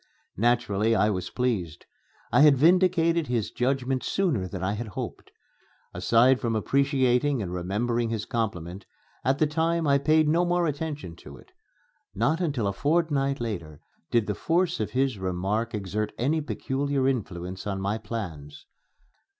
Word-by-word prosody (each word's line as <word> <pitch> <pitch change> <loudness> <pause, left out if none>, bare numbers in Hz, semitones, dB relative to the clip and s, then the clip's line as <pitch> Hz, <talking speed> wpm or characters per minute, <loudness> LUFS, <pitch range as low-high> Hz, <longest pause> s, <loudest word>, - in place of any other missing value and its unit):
Naturally 115 -2 +2
I 105 0 +3
was 90 -2 -3
pleased. 100 -10 -2 0.5
I - - +5
had 145 -2 +7
vindicated 170 0 +3
his 120 -4 -1
judgment 130 0 0
sooner 150 - 0
than 95 0 -6
I 95 - 0
had 110 +2 -4
hoped. 100 - -7 0.6
Aside 125 +3 +3
from 115 -1 -1
appreciating 135 +2 +2
and 90 -5 -4
remembering 115 +6 -1
his 110 -2 -3
compliment, 95 -5 -4 0.4
at 135 +1 +2
the 155 - +3
time 165 +2 0
I 140 -1 +4
paid 155 +2 +3
no 165 +3 +3
more 175 0 +1
attention 150 - -4
to 70 -3 -12
it. - - -19 0.6
Not 145 - +1
until 140 - -1
a 100 - 0
fortnight 145 - +1
later 85 -11 -5 0.3
did 115 -3 +2
the 105 - -1
force 175 - 0
of - - -1
his 130 -4 0
remark 95 +5 -2
exert 105 +1 -3
any 150 +6 +1
peculiar 140 -2 -1
influence 95 -7 -3
on 100 -1 -2
my 100 +3 -1
plans. 80 -13 -7
120 Hz, 150 wpm, -26 LUFS, 100-145 Hz, 0.6 s, had